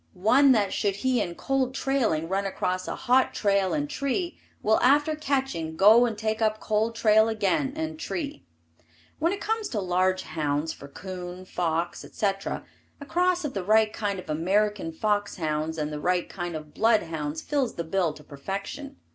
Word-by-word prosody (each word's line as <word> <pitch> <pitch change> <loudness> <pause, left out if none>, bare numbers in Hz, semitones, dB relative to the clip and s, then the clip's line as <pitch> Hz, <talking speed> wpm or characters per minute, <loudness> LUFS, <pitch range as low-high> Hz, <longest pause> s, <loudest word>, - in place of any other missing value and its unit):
One 255 +9 +5
that 205 -4 +1
should 200 -2 0
he 255 +4 +1
in 170 - -3
cold 265 +2 -1
trailing 235 - 0
run 195 +2 0
across 185 -1 -2
a - - -3
hot 255 +1 +2
trail 200 -2 +2
and 295 -1 -1
tree, 290 +5 -2 0.2
will 220 +1 +4
after 290 +4 +4
catching 265 - -2
go 220 +5 +7
and 220 -3 -4
take 220 +1 -2
up 215 -1 +1
cold 220 +1 0
trail 220 0 +4
again 220 +5 0
and 315 0 -4
tree. 305 -3 -4 0.8
When 330 +3 +2
it 400 - -3
comes 445 0 -1
to 215 - -2
large 185 0 +1
hounds 150 0 -2
for 140 - -11
coon, 180 +3 -8
fox, 170 -2 -2
etc., 195 -2 -2 0.3
a 285 - -8
cross 355 +2 +1
of 290 - -3
the 195 - -3
right 215 +2 +4
kind 205 -2 -2
of 185 -1 -8
American 185 +3 0
fox 205 +4 0
hounds 155 -1 -2
and 150 -1 -2
the 150 - -4
right 180 +1 +1
kind 175 -3 -5
of 150 -1 -8
blood 225 -1 +3
hounds 160 -2 -4
fills 280 -4 -1
the 170 - -3
bill 170 0 0
to 150 - -14
perfection. 200 - -6
205 Hz, 180 wpm, -26 LUFS, 175-260 Hz, 0.8 s, go